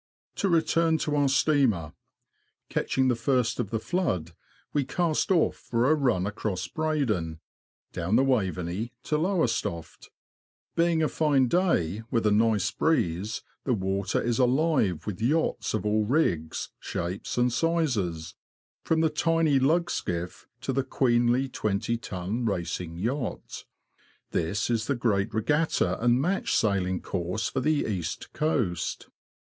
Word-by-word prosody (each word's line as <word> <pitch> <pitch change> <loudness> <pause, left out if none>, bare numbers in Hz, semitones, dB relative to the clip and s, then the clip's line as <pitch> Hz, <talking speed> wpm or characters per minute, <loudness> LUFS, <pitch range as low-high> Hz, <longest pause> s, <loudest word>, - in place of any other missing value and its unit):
To 195 - +1
return 165 -1 +3
to 150 - 0
our 145 -1 +3
steamer. 130 - +2 0.8
Catching 130 0 +1
the 125 - +3
first 120 -1 0
of 115 -5 -1
the 115 - -1
flood, 100 - -1 0.4
we 145 - +2
cast 160 +4 0
off 170 -4 +3
for 120 +4 0
a - - +7
run 125 -12 +1
across 100 -2 -3
Breydon, 120 - -1 0.5
down 90 +5 0
the 130 - +5
Waveney 100 -3 -1
to 150 - 0
Lowestoft. 125 - -1 0.7
Being 165 -1 +2
a - - +3
fine 145 -5 +2
day, 115 - +1
with 115 -2 0
a 105 - +4
nice 105 -2 +2
breeze, 105 - 0 0.2
the 125 - +1
water 95 0 -1
is 120 0 -1
alive 130 - +2
with 105 -1 -5
yachts 150 0 0
of 110 - -3
all 105 +1 +2
rigs, 95 - 0
shapes, 90 +4 -4
and 125 -1 +2
sizes, 120 - 0 0.5
from 160 0 +1
the 160 - +3
tiny 160 -2 +2
lug 165 +6 +2
skiff 90 0 -4
to 135 - -2
the 135 +1 +1
queenly 125 0 +2
twenty 110 -1 -1
ton 105 +1 -4
racing 85 -5 -3
yacht. 120 +6 -4 0.7
This 95 +4 0
is 115 -1 0
the 140 - +1
great 110 -4 0
regatta 115 - +1
and 120 +1 +4
match 180 +8 0
sailing 95 -3 +1
course 90 +5 -2
for 135 - -2
the 150 +2 +1
East 90 -5 -4
Coast. 125 - -1
120 Hz, 140 wpm, -27 LUFS, 95-150 Hz, 0.8 s, a